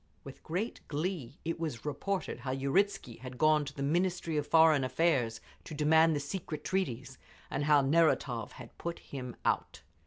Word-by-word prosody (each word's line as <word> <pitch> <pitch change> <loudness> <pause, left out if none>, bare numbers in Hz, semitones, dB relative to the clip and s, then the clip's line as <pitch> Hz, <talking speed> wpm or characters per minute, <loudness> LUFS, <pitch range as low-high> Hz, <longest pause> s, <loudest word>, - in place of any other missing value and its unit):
With 135 - -11
great 185 +8 -3
glee 150 -4 -3
it 165 0 -2
was 150 -8 -4
reported 190 +6 -2
how 135 - -6
Uritzky 135 - 0
had 125 +1 -8
gone 155 +1 +4
to 140 - -7
the 140 - -3
Ministry 170 +2 0
of 150 -1 -1
Foreign 160 -4 +5
Affairs 130 -4 +1 0.3
to 155 - -7
demand 160 +2 +4
the - - 0
secret 155 0 -5
treaties, 135 -8 -2 0.3
and 145 - -1
how 150 -1 +5
Neratov 140 -5 +2
had 120 -2 -12
put 170 0 -4
him 125 -3 -7
out. - - -1
150 Hz, 165 wpm, -31 LUFS, 135-165 Hz, 0.3 s, Foreign